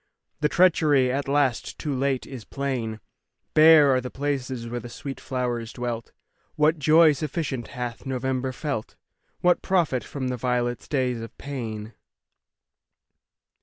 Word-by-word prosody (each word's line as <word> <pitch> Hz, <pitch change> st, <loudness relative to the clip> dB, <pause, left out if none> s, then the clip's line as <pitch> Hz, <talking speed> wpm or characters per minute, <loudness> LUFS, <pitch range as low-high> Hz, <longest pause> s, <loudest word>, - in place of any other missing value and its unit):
The 150 Hz, -1 st, +2 dB
treachery, 150 Hz, -8 st, +4 dB
at 140 Hz, +1 st, -2 dB
last, 140 Hz, -4 st, 0 dB
too 150 Hz, -3 st, -3 dB
late, 135 Hz, 0 st, 0 dB
is 130 Hz, -5 st, -8 dB
plain; 125 Hz, -5 st, -3 dB, 0.5 s
Bare 155 Hz, -3 st, +7 dB
are 130 Hz, -, +2 dB
the 125 Hz, -, -5 dB
places 130 Hz, -4 st, -3 dB
where 120 Hz, +1 st, -3 dB
the 120 Hz, -, -9 dB
sweet 135 Hz, +3 st, -7 dB
flowers 120 Hz, -3 st, -3 dB
dwelt. 120 Hz, -2 st, -4 dB, 0.4 s
What 155 Hz, +1 st, +3 dB
joy 155 Hz, +2 st, +6 dB
sufficient 145 Hz, -3 st, -3 dB
hath 125 Hz, -1 st, -6 dB
November 130 Hz, 0 st, -1 dB
felt? 130 Hz, -4 st, -4 dB, 0.5 s
What 180 Hz, 0 st, +3 dB
profit 165 Hz, -, +1 dB
from 130 Hz, 0 st, -4 dB
the 125 Hz, -, -2 dB
violet's 120 Hz, 0 st, -1 dB
day 130 Hz, -3 st, +1 dB
of 115 Hz, -1 st, -8 dB
pain? 115 Hz, -6 st, -6 dB
130 Hz, 135 wpm, -25 LUFS, 120-145 Hz, 0.5 s, Bare